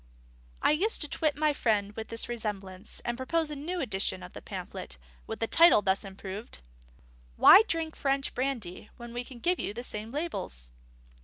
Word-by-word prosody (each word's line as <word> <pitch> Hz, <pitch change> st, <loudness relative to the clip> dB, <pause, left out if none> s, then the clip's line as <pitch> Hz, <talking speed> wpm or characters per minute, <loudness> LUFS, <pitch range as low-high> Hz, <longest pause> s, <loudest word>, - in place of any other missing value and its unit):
I -, -, +5 dB
used 385 Hz, +9 st, +2 dB
to 300 Hz, -, -1 dB
twit 300 Hz, 0 st, 0 dB
my 305 Hz, 0 st, +2 dB
friend 210 Hz, -5 st, 0 dB
with 220 Hz, 0 st, -5 dB
this 230 Hz, 0 st, -2 dB
resemblance, 205 Hz, -4 st, -5 dB
and 240 Hz, -, -1 dB
propose 305 Hz, +5 st, -1 dB
a -, -, -4 dB
new 335 Hz, +6 st, -4 dB
edition 205 Hz, -, 0 dB
of -, -, -10 dB
the -, -, -8 dB
pamphlet, 60 Hz, -, -7 dB, 0.3 s
with -, -, -4 dB
the 225 Hz, -, +1 dB
title 330 Hz, -4 st, +6 dB
thus 190 Hz, 0 st, +1 dB
improved: 195 Hz, -, -8 dB, 0.8 s
_Why 440 Hz, +3 st, +9 dB
Drink 325 Hz, -1 st, -2 dB
French 275 Hz, 0 st, 0 dB
Brandy, 240 Hz, -8 st, -3 dB
when 235 Hz, -1 st, -9 dB
we 245 Hz, +1 st, -3 dB
give 265 Hz, +9 st, -1 dB
you 205 Hz, -, -3 dB
the 240 Hz, -, -5 dB
same 215 Hz, -2 st, -5 dB
labels? 230 Hz, -, -4 dB
240 Hz, 175 wpm, -29 LUFS, 205-300 Hz, 0.8 s, Why